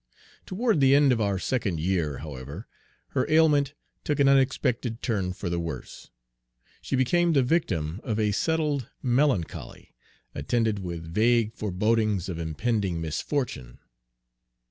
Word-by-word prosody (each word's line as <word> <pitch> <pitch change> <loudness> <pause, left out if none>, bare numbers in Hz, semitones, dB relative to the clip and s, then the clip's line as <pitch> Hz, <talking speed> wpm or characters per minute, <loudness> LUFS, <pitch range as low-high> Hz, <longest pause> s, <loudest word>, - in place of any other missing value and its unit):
Toward 215 -1 +1
the 135 0 +5
end 140 -1 +5
of 115 -2 +1
our 100 -2 +1
second 95 -5 -1
year, 80 -4 0
however, 70 - -8 0.4
'her - - -1
ailment 150 -2 +3 0.3
took 145 -2 -1
an 140 - +5
unexpected 130 -3 +1
turn 100 -7 -1
for 90 +1 -6
the 85 0 -1
worse. 85 -1 -7 0.7
She - - -2
became 170 +7 +2
the 135 -3 +4
victim 95 - -1
of 110 -4 -2
a 105 -1 +2
settled 150 +1 0
melancholy, 125 - -1 0.4
attended 110 +8 0
with 85 -3 -6
vague 115 +1 +3
forebodings 105 -1 0
of 85 -2 -4
impending 90 +3 -1
misfortune. 80 - -3
110 Hz, 130 wpm, -26 LUFS, 90-135 Hz, 0.7 s, the